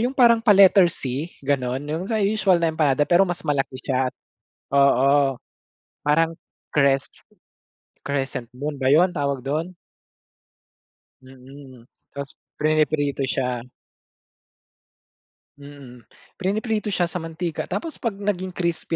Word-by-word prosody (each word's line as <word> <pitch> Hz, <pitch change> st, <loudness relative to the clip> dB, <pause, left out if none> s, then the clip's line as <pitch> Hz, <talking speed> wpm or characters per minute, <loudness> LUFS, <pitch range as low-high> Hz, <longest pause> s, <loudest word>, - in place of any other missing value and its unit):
'yung 250 Hz, +3 st, -1 dB
parang 235 Hz, -3 st, +5 dB
pa 210 Hz, -, +7 dB
letter 195 Hz, -2 st, +7 dB
c 140 Hz, +2 st, -4 dB
gano'n 130 Hz, -1 st, -1 dB
'yung 160 Hz, +4 st, -3 dB
sa 220 Hz, -2 st, 0 dB
usual 200 Hz, -3 st, +2 dB
na 165 Hz, -, +3 dB
empanada 145 Hz, -3 st, +2 dB
pero 180 Hz, +2 st, +5 dB
mas 175 Hz, -, -4 dB
malaki 140 Hz, -3 st, -1 dB
siya, 130 Hz, -1 st, 0 dB, 0.7 s
oo 140 Hz, 0 st, +4 dB, 0.7 s
parang 165 Hz, +2 st, +2 dB, 0.4 s
cres 140 Hz, -2 st, +1 dB, 0.8 s
crescent 135 Hz, -4 st, -3 dB
moon 145 Hz, +2 st, -4 dB
ba 130 Hz, -, +1 dB
'yun 175 Hz, +5 st, +5 dB
tawag 140 Hz, -4 st, -1 dB
dun? 155 Hz, +6 st, -2 dB, 1.5 s
Mm, 130 Hz, -1 st, -14 dB, 0.3 s
ta's 140 Hz, 0 st, -7 dB, 0.2 s
priniprito 150 Hz, -2 st, +1 dB
siya. 125 Hz, -2 st, -1 dB, 2.0 s
Mm, 140 Hz, -4 st, -13 dB, 0.3 s
piniprito 215 Hz, +2 st, -1 dB
siya 175 Hz, -4 st, 0 dB
sa 180 Hz, -, -3 dB
mantika 165 Hz, 0 st, -4 dB
tapos 330 Hz, -2 st, -5 dB
'pag 230 Hz, -5 st, -2 dB
naging 185 Hz, -3 st, -3 dB
crispy 170 Hz, -1 st, -2 dB
150 Hz, 115 wpm, -23 LUFS, 135-180 Hz, 2.0 s, pa